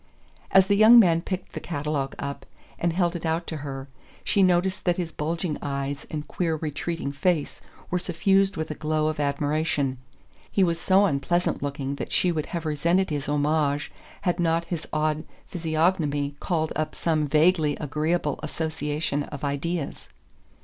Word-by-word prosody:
As 190 -1 +6
the 200 - +2
young 220 +3 +8
man 170 -7 +6
picked 185 0 -5
the - - -4
catalogue 145 -3 -3
up 140 0 -5 0.3
and 170 - +1
held 175 0 +1
it 170 - -5
out 165 +1 0
to 160 - -4
her 135 -2 -6 0.4
she 200 - +2
noticed 185 0 +2
that 175 -1 +2
his 170 -3 -3
bulging 160 +1 -2
eyes 140 0 -3
and 150 -1 -5
queer 165 -3 -1
retreating 155 0 -3
face 155 +1 0 0.3
were 180 - +1
suffused 195 +2 +2
with 160 0 -3
a - - -1
glow 155 0 0
of 155 - -4
admiration. 145 -2 0 0.5
He 195 - +3
was 170 -1 0
so 195 +2 +5
unpleasant 175 +2 0
looking 140 -1 -3
that - - -5
she 180 - +3
would 155 -3 -2
have 170 -2 -4
resented 170 +5 +1
his 145 -1 -2
homage 145 0 +1 0.3
had 175 -1 0
not 165 0 +1
his 170 -2 -4
odd 155 0 0 0.2
physiognomy 160 -4 0
called 160 -4 -1
up 155 0 -2
some 155 -3 +1
vaguely 155 0 +3
agreeable 150 0 -1
association 150 -1 -2
of 145 -1 -8
ideas. 145 +2 -3
155 Hz, 165 wpm, -25 LUFS, 145-175 Hz, 0.5 s, young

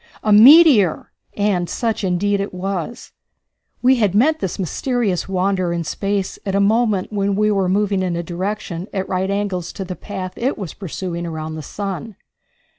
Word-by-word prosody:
"A 215 - +3
meteor!" 240 - +7 0.3
And 200 -4 0
such 225 -3 -2
indeed 195 +2 +1
it 200 -2 -4
was. 190 +3 -4 0.7
We 260 +1 +5
had 205 -5 +1
met 310 +9 +3
this 190 - -3
mysterious 200 - -1
wanderer 185 -1 0
in 170 -1 -2
space 195 +3 -2
at 195 -1 -2
a - - +3
moment 215 -1 +1
when 200 -1 0
we 210 +1 +2
were 195 -3 +1
moving 200 0 +1
in 180 -2 -1
a 170 - -3
direction 180 0 -4
at 190 -1 -2
right 185 +1 -1
angles 200 -3 -2
to 195 - -5
the 185 0 -6
path 185 -2 -6
it 260 +4 -1
was 190 -6 -6
pursuing 175 -2 -5
around 160 -1 -5
the 155 - -6
sun. 200 - -6
195 Hz, 175 wpm, -19 LUFS, 180-210 Hz, 0.7 s, meteor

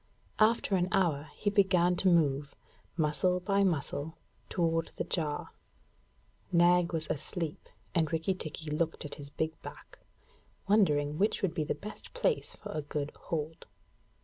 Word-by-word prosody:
After 215 -2 +4
an 180 -1 +2
hour 160 -6 +1
he 205 - 0
began 185 -3 +4
to 190 - +2
move, 145 -4 +2 0.4
muscle 165 +4 +2
by 195 +2 +2
muscle, 160 -2 -1 0.3
toward 165 -2 +1
the - - 0
jar. 150 -4 -2 1.0
Nag 175 0 +5
was 165 -2 -2
asleep, 160 +1 -4 0.2
and 160 -4 +1
Rikki 165 +3 +1
tikki 155 -3 -6
looked 160 +1 -1
at 145 - -6
his 140 - -8
big 160 +2 -3
back, - - -11 0.7
wondering 150 -8 +3
which 205 +1 +1
would 180 -4 +1
be 160 -3 0
the - - -1
best 210 - -10
place - - 0
for - - -8
a 155 - -2
good 145 0 -3
hold. 160 0 -5
165 Hz, 150 wpm, -31 LUFS, 150-185 Hz, 1.0 s, Nag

